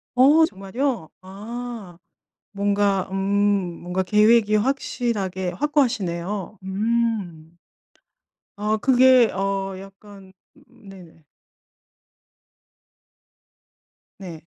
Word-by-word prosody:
어 290 +6 +6
정말이요? 195 - -4
아 210 -1 -8 0.5
뭔가 200 -1 0
음 - - -2 0.6
뭔가 180 +2 -2
계획이 215 +2 +4
확실하게 210 -6 -2
확고하시네요. 205 - -2
음. 195 -5 -2 1.0
어 210 +1 0
그게 255 0 +5
어 195 0 -2
약간 195 0 -14 0.3
네네. 195 -9 -16 2.9
네. 175 -5 -9
200 Hz, 140 characters per minute, -22 LUFS, 190-235 Hz, 2.9 s, 어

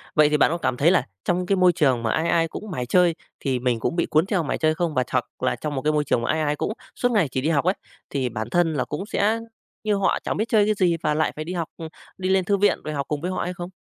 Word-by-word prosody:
vậy 150 -1 +6
thì 150 - +2
bạn - - +4
có 170 - 0
cảm 130 -7 -1
thấy 160 +7 +4
là 185 - +2 0.2
trong 180 +1 0
cái 195 - +2
môi 185 -1 +5
trường 135 -8 +2
mà 115 - +1
ai 165 +2 0
ai 165 -1 +3
cũng 210 +5 -8
mải 125 -7 -3
chơi 175 +5 +3 0.2
thì 130 -3 -1
mình 120 -2 0
cũng 140 - -1
bị 170 - +1
cuốn 155 +2 +2
theo 195 -4 0
mải 145 - -2
chơi 155 0 +2
không? 170 -1 -1
Và 130 - +2
hoặc - - 0 0.2
là - - 0
trong 150 -1 -4
một 135 - -2
cái 155 +2 +1
môi 150 -1 +2
trường 130 - 0
mà - - 0
ai 155 +1 0
ai 150 -1 0
cũng 205 - -2 0.2
suốt 245 - +1
ngày 205 -9 +3
chỉ 130 - -1
đi 150 - 0
học 155 -1 +1
ấy, 185 - +3 0.4
thì 130 -3 -1
bản 110 0 -5
thân 175 +2 +2
là 135 -4 -1
cũng 150 +6 -5
sẽ 215 +1 +1 0.4
như 210 -1 +1
họ 195 -1 +1
chẳng - - -2
biết 215 - +1
chơi 210 -2 +4
cái 215 - +2
gì, 180 -4 +2
và 150 -1 +2
lại 155 +1 +1
phải 155 - -4
đi 180 - -4
học, 170 -3 -2
ừm, 165 - -6 0.3
đi 185 -1 -2
lên 190 -1 +3
thư 200 +2 +2
viện 205 +1 +3
rồi 155 - -4
học 140 -2 -3
cùng 150 -1 -3
với 180 +2 -2
họ - - -2
hay 180 - -3
không? 175 0 -7
165 Hz, 320 wpm, -23 LUFS, 145-185 Hz, 0.4 s, vậy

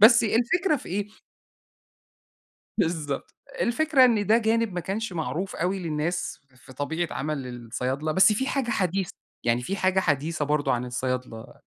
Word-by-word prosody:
بس 230 +2 +8
الفكرة 300 - +2
في - - -10
إيه؟ 200 +3 -1 1.7
بالضبط، 155 -4 -1 0.3
الفكرة 275 +2 +4
إن 220 -4 +2
ده 220 +2 +6
جانب 225 -2 +1
ما 175 - -1
كانش 195 +4 -3
معروف 165 +3 -3
أوي 185 +3 -1
للناس 165 0 -2 0.2
في 125 +1 -15
طبيعة 160 +6 -2
عَمَل 145 -3 -3
الصيادلة، 125 +5 -3
بس 190 +6 +6
فيه 265 +6 -1
حاجة 270 -4 -1
حديثة، 190 -4 0 0.3
يعني 120 +1 +2
فيه 190 +11 -3
حاجة 190 -1 +2
حديثة 150 -1 0
برضه 150 0 +1
عن 120 0 0
الصيادلة. 125 -2 -4
175 Hz, 150 wpm, -26 LUFS, 145-220 Hz, 1.7 s, بس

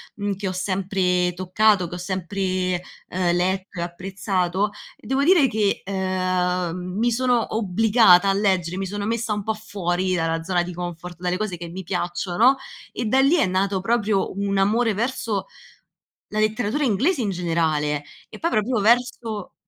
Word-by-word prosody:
mhmm, 205 -1 -2
che 195 0 -4
ho - - -1
sempre 185 -1 0
toccato, 185 +1 +2
che 175 - -7
ho - - -5
sempre, 185 0 -2 0.3
ehm, 175 -1 +1
letto 185 +1 -1
e - - -1
apprezzato, 185 +2 -1 0.2
e - - -22
devo 270 +2 +1
dire 330 -5 +5
che, 210 -3 0
ehm, 185 -2 -1 0.2
mi 240 +2 +2
sono 245 -2 +1
obbligata 205 -2 +5
a - - +3
leggere, 185 -3 0
mi 195 0 -2
sono 205 +1 -4
messa 230 0 -1
un 205 -1 -3
po' 220 - -1
fuori 185 -4 -2
dalla 165 -1 0
zona 175 0 +1
di 180 0 -6
comfort, 175 0 -6
dalle 180 0 -1
cose 210 -4 -3
che 170 0 -7
mi 185 +3 -7
piacciono, 180 +7 +1 0.4
e 235 - -4
da 260 +5 +3
lì 275 +6 +5
è 320 - +3
nato 190 +1 0
proprio 210 -1 +1
un 200 0 -1
amore 220 +4 +2
verso 220 -3 -2 0.9
la 215 - -1
letteratura 220 +5 0
inglese 265 - +1
in 215 - -1
generale, 160 -4 0 0.3
e - - -11
poi 335 - 0
proprio 220 +2 +1
verso 230 -2 +1
195 Hz, 170 wpm, -23 LUFS, 180-220 Hz, 0.9 s, dire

